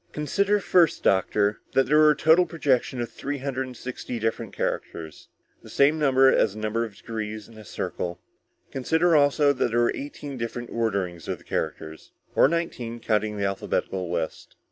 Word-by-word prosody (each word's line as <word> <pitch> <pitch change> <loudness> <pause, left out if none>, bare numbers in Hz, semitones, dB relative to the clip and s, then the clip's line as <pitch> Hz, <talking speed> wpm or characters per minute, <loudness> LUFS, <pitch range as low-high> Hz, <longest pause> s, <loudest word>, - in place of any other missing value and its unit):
"Consider 200 +8 +1
first, 175 -4 +3
doctor, 100 +2 +2
that 135 - +4
there 150 +4 +4
was 155 0 +7
a - - -10
total 165 +4 +5
projection 135 -6 0
of 120 - -4
three 145 +1 -4
hundred 135 -1 -3
and 125 -2 -10
sixty 125 0 -6
different 115 -1 -2
characters. 80 -2 -4 0.3
The - - -14
same 145 +3 +3
number 135 -2 +5
as 105 -2 +2
the - - -7
number 110 +2 -1
of 110 -3 -7
degrees 110 -2 -6
in 115 - -16
a 110 - -11
circle. 85 -3 -4 0.5
Consider 160 +6 +2
also 145 0 +4
that 130 - 0
there 115 +1 +1
were 120 - +3
eighteen 140 -1 -7
different 120 +1 -5
orderings 100 -7 -2
of - - -2
the - - -20
characters, 80 0 -5 0.2
or - - +5
nineteen 130 -8 -3
counting 105 -1 0
the 100 - -1
alphabetical 95 -2 -2
list. 85 -2 -4
120 Hz, 180 wpm, -25 LUFS, 105-145 Hz, 0.5 s, was